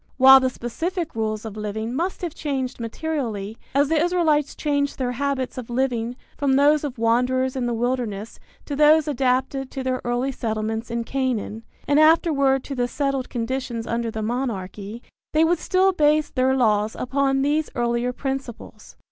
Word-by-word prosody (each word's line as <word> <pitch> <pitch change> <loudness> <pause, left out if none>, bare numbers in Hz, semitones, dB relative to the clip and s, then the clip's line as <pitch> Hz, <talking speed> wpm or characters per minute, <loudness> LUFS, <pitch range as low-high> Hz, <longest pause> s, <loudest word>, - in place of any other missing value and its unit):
While 265 0 +9
the 260 0 +1
specific 330 +8 -4
rules 215 -1 -2
of 215 -2 -6
living 215 +2 -4
must 350 +7 -2
have 340 -4 -3
changed 265 -5 -3
materially, 230 -4 -4 0.2
as 285 +1 +4
the 320 -1 +3
Israelites 320 -5 +1
changed 285 -2 -1
their 250 -2 -1
habits 265 0 -2
of 245 - -8
living 240 -1 -1 0.2
from 280 -2 +1
those 290 +2 +4
of 275 -4 -4
wanderers 250 +3 +1
in 250 -2 -1
the 240 - -1
wilderness 230 -3 -2 0.3
to 285 - -4
those 305 +1 +5
adapted 265 0 0
to 265 - -5
their 255 -1 -1
early 245 +3 -1
settlements 220 -1 -3
in 235 0 -2
Canaan 240 -4 -2 0.3
and 290 +1 +4
afterward 295 -4 +4
to 280 - -6
the 245 -2 0
settled 275 0 -2
conditions 240 -1 -3
under 235 0 -2
the 220 -1 -4
monarchy, 215 -2 -4 0.3
they 310 +1 +4
would 335 +1 +2
still 375 +2 +3
base 305 -3 +2
their 260 0 +2
laws 215 -3 +2
upon 270 +1 0
these 300 +2 +1
earlier 240 0 0
principles. 265 -2 -6
260 Hz, 165 wpm, -23 LUFS, 235-285 Hz, 0.3 s, While